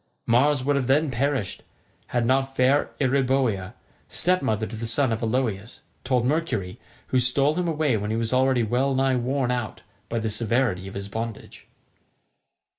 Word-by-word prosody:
Mars 130 +3 +3
would 145 +2 +1
have 130 -3 -1
then 145 +2 +2
perished 130 -4 -1 0.5
had 120 -1 0
not 135 +2 +1
fair 135 +3 +3
Eeriboea, 130 -7 +1 0.4
stepmother 135 - +1
to 115 - -7
the 115 +1 -4
sons 120 +1 +2
of 110 - -3
Aloeus, 115 -2 -2 0.2
told 125 -2 +1
Mercury, 130 - -1 0.3
who 130 - +2
stole 135 +4 +2
him 175 +1 -1
away 155 -6 +1
when 105 0 -3
he 110 - -1
was 115 +1 -1
already 130 -1 +3
well 130 +5 +1
nigh 135 0 +2
worn 125 +1 0
out 120 -3 -3 0.3
by 115 - -2
the 110 -1 -1
severity 110 -3 0
of 95 - -9
his 100 0 -5
bondage. 115 +1 -7
125 Hz, 165 wpm, -24 LUFS, 115-135 Hz, 0.5 s, Mars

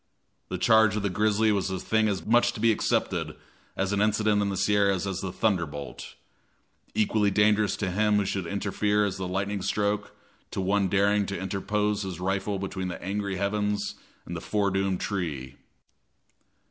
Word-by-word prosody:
The - - -2
charge 110 -2 +4
of 105 - -2
the 100 - 0
grizzly 105 +2 +2
was 100 -1 0
a 95 - -2
thing 110 +4 +1
as 100 -3 -2
much 120 +1 +3
to - - -8
be 115 +1 +4
accepted 110 - 0 0.4
as 95 +1 0
an 100 - +1
incident 105 0 +2
of 100 - 0
the 95 - -2
Sierras 100 -1 +2
as 95 -2 -3
the 95 -2 -4
thunderbolt 85 - -2 0.8
equally 105 -1 +2
dangerous 105 0 +3
to 95 -3 -2
him 105 +2 +2
who 105 -1 +2
should 95 -2 -2
interfere 105 +2 0
as 100 -2 -3
the 95 -1 -3
lightning 100 +2 -2
stroke 105 +2 -1 0.3
to - - -5
one 100 +1 +2
daring 100 +1 +2
to 100 -2 -4
interpose 105 +2 -1
his 95 -4 -5
rifle 95 +2 -1
between 95 -1 -4
the 90 - -5
angry 100 +1 -3
heavens 105 +1 -1 0.3
and - - -6
the - - -5
fore 100 -2 0
doomed 95 -1 0
tree. 75 -9 -3
100 Hz, 175 wpm, -27 LUFS, 95-105 Hz, 0.8 s, charge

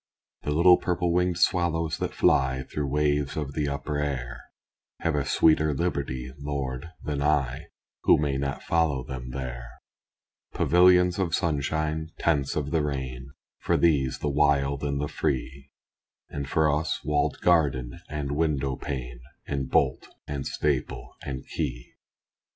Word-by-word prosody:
The - - -4
little 90 +4 +6
purple 90 -1 0
winged 90 -1 +1
swallows 85 -2 +1
that - - -3
fly 65 0 +3
Through 75 +2 -3
waves 75 0 0
of 70 -3 -3
the 75 0 -1
upper 70 +1 -3
air, 65 -3 -3 0.6
Have 80 - +1
a 75 -1 +1
sweeter 80 -1 +3
liberty, 65 -6 -2
Lord, 70 0 -4
than 75 -2 -2
I, 70 -4 0 0.4
Who - - +7
may 70 -2 0
not 70 -1 -3
follow 80 -6 +1
them 65 -1 -7
there. 60 -2 -5 0.9
Pavilions 90 +1 +5
of 85 -4 +1
sunshine 80 -1 -1
tents 70 -5 +1
of 75 -1 -2
the 80 -2 +2
rain, 65 -2 -4 0.3
For - - +1
these, 70 -6 +2
the - - -3
wild 70 -1 +2
and 70 -1 -1
the 75 - -1
free; 70 0 -3 0.6
And 70 -1 -5
for 80 -1 +3
us 75 +2 -1
walled 75 -1 0
garden 70 -8 +2
and 75 -2 -3
window 70 -4 0
pane, - - -5 0.3
And 70 -2 -3
bolt - - +1 0.2
and 70 -2 -4
staple 70 -4 -2
and 65 -2 -5
key. - - -4
70 Hz, 145 wpm, -26 LUFS, 65-80 Hz, 0.9 s, Who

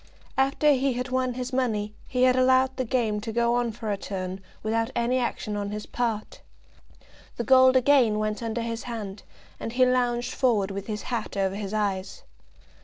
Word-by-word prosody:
After 275 +3 +3
he 270 -1 +2
had 250 +1 -3
won 255 -1 0
his 255 +1 -4
money, 215 -5 0
he 250 0 0
had 255 0 +5
allowed 260 +1 +3
the 260 - -2
game 225 -4 0
to 225 - -4
go 235 +1 +2
on 240 -1 +1
for 220 -1 -4
a 200 - -1
turn 190 -1 -5 0.2
without 225 +1 0
any 240 +2 +1
action 230 -3 -2
on 205 -1 -3
his 210 +1 -5
part. 230 -3 -3 1.0
The 235 - -1
gold 260 +1 +6
again 255 -4 +4
went 215 +1 -2
under 230 0 -2
his 230 0 -3
hand, 215 -5 -6 0.4
and 225 - -5
he 255 +1 +4
lounged 245 -1 +1
forward 215 -7 +1
with 195 0 -5
his 210 -2 -4
hat 230 -4 -4
over 195 -1 +1
his 200 -1 -4
eyes. 200 -3 -2
235 Hz, 185 wpm, -26 LUFS, 210-255 Hz, 1.0 s, gold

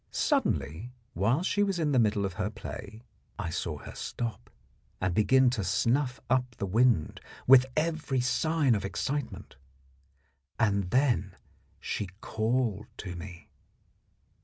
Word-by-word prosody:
Suddenly, 105 - 0 0.2
while 115 - +1
she 205 +2 +1
was 195 -3 +1
in 155 -3 +1
the 130 - +4
middle 105 -3 +2
of 95 - -3
her 105 +2 -2
play, 110 0 -8 0.3
I 90 -5 -3
saw 80 -2 -3
her - - -10
stop 115 -2 -5 0.5
and 95 -1 0
begin 125 +6 +4
to 115 -5 -2
snuff 125 - +1
up 125 -1 +1
the 100 - -3
wind 110 -4 +2 0.2
with 130 0 +7
every 155 -4 0
sign 140 +2 +2
of 100 -3 -1
excitement. 125 - -4 1.0
Then 100 - +1 0.4
she 105 - -3
called 110 -2 -1
to 90 -2 -6
me. 85 0 -10
115 Hz, 130 wpm, -29 LUFS, 100-130 Hz, 1.0 s, with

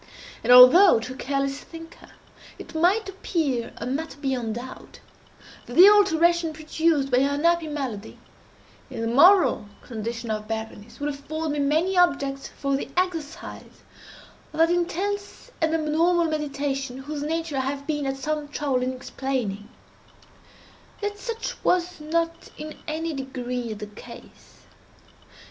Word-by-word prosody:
And 240 - +2
although, 255 - +9
to 250 +3 -6
a - - -12
careless 275 +1 -2
thinker, 330 0 -12 0.5
it - - -11
might 365 +6 +2
appear 315 -10 -2
a - - -5
matter 285 +4 -4
beyond 250 -6 -2
doubt, 250 +2 -9 0.7
that 245 - -8
the 370 +5 +10
alteration 340 -5 +3
produced 310 -2 0
by 250 - +4
her 280 +1 +1
unhappy 335 +2 +2
malady, 260 -8 -5 0.7
in - - -6
the 230 - -1
moral 310 - +5 0.2
condition 230 0 -5
of 215 0 -4
Berenice, 220 +1 -6
would 290 +1 -2
afford 305 +3 -4
me 295 - -2
many 315 +7 +1
objects 280 -6 +1
for 275 -1 -2
the 270 - -4
exercise 340 -5 -4 0.7
of - - -8
that 330 +1 +4
intense 400 +7 -2
and 320 0 +2
abnormal 330 +3 +2
meditation 280 -4 -3
whose 290 +2 -6
nature 320 -1 -2
I - - +1
have 275 +1 -3
been 295 -2 -2
at 270 0 -2
some 300 +2 -3
trouble 285 -3 -1
in 255 +1 -1
explaining, 250 -6 -4 1.3
yet 410 0 -4
such 460 0 -5
was 360 -1 +1
not 330 +2 -2
in 305 0 -7
any 320 +1 -3
degree 250 -3 -4
the 210 - -7
case. 210 0 -14
290 Hz, 140 wpm, -24 LUFS, 260-330 Hz, 1.3 s, the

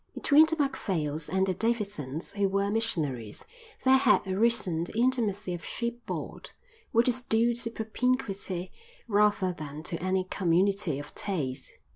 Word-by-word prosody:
Between 310 +2 +5
the 320 - +2
Macphails 180 - -1
and 190 0 +2
the 190 - 0
Davidsons, 200 - -2
who 200 -1 0
were 200 +1 0
missionaries, 150 - -2 0.4
there 265 0 +6
had 265 - +4
arisen 195 -4 +2
the 215 - -8
intimacy 220 -6 +1
of 170 -2 -6
shipboard, 235 0 -5 0.4
which 230 +1 +3
is 250 0 +1
due 235 0 +2
to 235 0 -1
propinquity 220 -5 -2 0.4
rather 205 -3 +2
than 155 -2 -8
to 170 -1 -4
any 185 +1 +1
community 185 -2 +1
of 145 +1 -8
taste. 140 -9 -3
200 Hz, 140 wpm, -28 LUFS, 170-235 Hz, 0.4 s, there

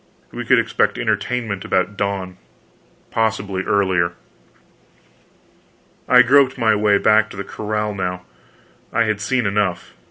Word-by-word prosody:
We - - -6
could - - +4
expect - - 0
entertainment 110 -6 -2
about 95 +2 -1
dawn, 100 -2 -3 0.7
possibly 105 -4 -1
earlier. 95 -4 +1 2.0
I 125 0 +7
groped 130 +1 +4
my 115 -3 +3
way 105 -1 +3
back 110 +1 +3
to - - -11
the 100 - -4
corral 105 0 -3
now; 90 -2 -4 0.7
I 115 - +2
had 110 -2 -2
seen 125 +3 0
enough. 100 -7 -1
105 Hz, 125 wpm, -19 LUFS, 95-110 Hz, 2.0 s, I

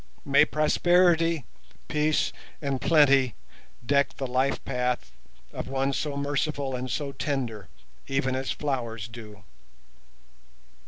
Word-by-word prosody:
May 140 0 +5
prosperity, 165 0 +3 0.4
peace 150 0 +1 0.3
and 140 -3 -2
plenty 140 - +4 0.5
deck 140 +2 +2
the 135 - -3
life 130 +2 +1
path 125 - -1 0.4
of - - -5
one 135 +1 0
so 145 0 -2
merciful 140 -1 -1
and 125 +1 -4
so 140 +2 -2
tender, 125 - -3 0.4
even 135 -1 0
as 130 0 -3
flowers 120 -7 -3
do. 110 -4 -11
135 Hz, 110 wpm, -27 LUFS, 125-150 Hz, 0.5 s, May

